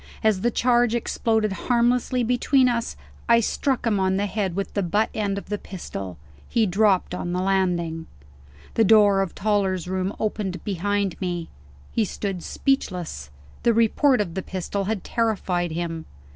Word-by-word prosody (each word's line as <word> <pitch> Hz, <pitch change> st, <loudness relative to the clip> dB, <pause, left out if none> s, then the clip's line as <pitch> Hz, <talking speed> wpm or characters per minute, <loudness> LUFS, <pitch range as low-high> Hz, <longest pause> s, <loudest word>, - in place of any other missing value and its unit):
As 215 Hz, -4 st, +3 dB
the 240 Hz, -, +2 dB
charge 240 Hz, 0 st, +2 dB
exploded 220 Hz, -2 st, 0 dB
harmlessly 245 Hz, +5 st, +1 dB
between 250 Hz, +2 st, +3 dB
us, 235 Hz, -1 st, -1 dB, 0.3 s
I 235 Hz, 0 st, +7 dB
struck 255 Hz, +3 st, 0 dB
him 215 Hz, -4 st, +2 dB
on 190 Hz, 0 st, +1 dB
the 200 Hz, -, +1 dB
head 195 Hz, -3 st, -2 dB
with 200 Hz, 0 st, -3 dB
the 200 Hz, -, 0 dB
butt 205 Hz, +5 st, +1 dB
end 200 Hz, -2 st, -1 dB
of 200 Hz, -, -7 dB
the 210 Hz, -1 st, -2 dB
pistol. 100 Hz, -, -7 dB, 0.3 s
He 230 Hz, -2 st, +2 dB
dropped 195 Hz, -1 st, +2 dB
on 175 Hz, -1 st, -3 dB
the 180 Hz, -, 0 dB
landing. 180 Hz, -4 st, 0 dB, 0.7 s
The 225 Hz, -, +3 dB
door 205 Hz, -2 st, +5 dB
of 195 Hz, -, -3 dB
Toller's 195 Hz, -3 st, 0 dB
room 185 Hz, +1 st, -1 dB
opened 200 Hz, -5 st, -2 dB
behind 200 Hz, 0 st, -1 dB
me. 175 Hz, -3 st, -3 dB, 0.4 s
He 230 Hz, -, +1 dB
stood 195 Hz, -2 st, -3 dB
speechless; 180 Hz, -, -2 dB, 0.3 s
the 235 Hz, -2 st, +3 dB
report 230 Hz, +3 st, +3 dB
of 175 Hz, -5 st, -3 dB
the 190 Hz, -, -2 dB
pistol 190 Hz, +2 st, -3 dB
had 205 Hz, -2 st, -2 dB
terrified 195 Hz, -6 st, 0 dB
him. 165 Hz, 0 st, -4 dB
200 Hz, 160 wpm, -24 LUFS, 180-225 Hz, 0.7 s, I